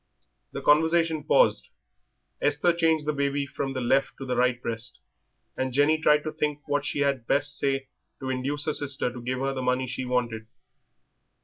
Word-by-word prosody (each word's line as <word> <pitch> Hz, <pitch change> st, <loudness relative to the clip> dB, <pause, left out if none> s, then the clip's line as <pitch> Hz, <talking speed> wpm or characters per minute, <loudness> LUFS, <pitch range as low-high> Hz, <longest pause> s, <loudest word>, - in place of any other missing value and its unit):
The -, -, -6 dB
conversation 160 Hz, +1 st, +3 dB
paused. -, -, +3 dB, 0.7 s
Esther 145 Hz, +4 st, +2 dB
changed 160 Hz, -3 st, +2 dB
the 150 Hz, -, 0 dB
baby 140 Hz, 0 st, 0 dB
from 140 Hz, -1 st, -4 dB
the 130 Hz, -, -3 dB
left 135 Hz, +3 st, +1 dB
to 135 Hz, -, -7 dB
the 125 Hz, -, -2 dB
right 125 Hz, 0 st, +2 dB
breast, 115 Hz, 0 st, -5 dB, 0.6 s
and 130 Hz, 0 st, -2 dB
Jenny 145 Hz, +4 st, +3 dB
tried 150 Hz, -1 st, +4 dB
to 155 Hz, -, -3 dB
think 150 Hz, -1 st, -2 dB
what 145 Hz, 0 st, 0 dB
she 145 Hz, -, -1 dB
had 135 Hz, -5 st, 0 dB
best 145 Hz, +1 st, +1 dB
say 135 Hz, -1 st, -1 dB, 0.3 s
to 130 Hz, -1 st, -3 dB
induce 140 Hz, +3 st, -1 dB
her 155 Hz, -, 0 dB
sister 140 Hz, -4 st, -1 dB
to 125 Hz, -, -8 dB
give 130 Hz, +2 st, -2 dB
her 135 Hz, 0 st, 0 dB
the 130 Hz, -, -4 dB
money 125 Hz, +1 st, 0 dB
she 130 Hz, +1 st, -4 dB
wanted. 120 Hz, -3 st, -2 dB
140 Hz, 185 wpm, -26 LUFS, 130-150 Hz, 0.7 s, tried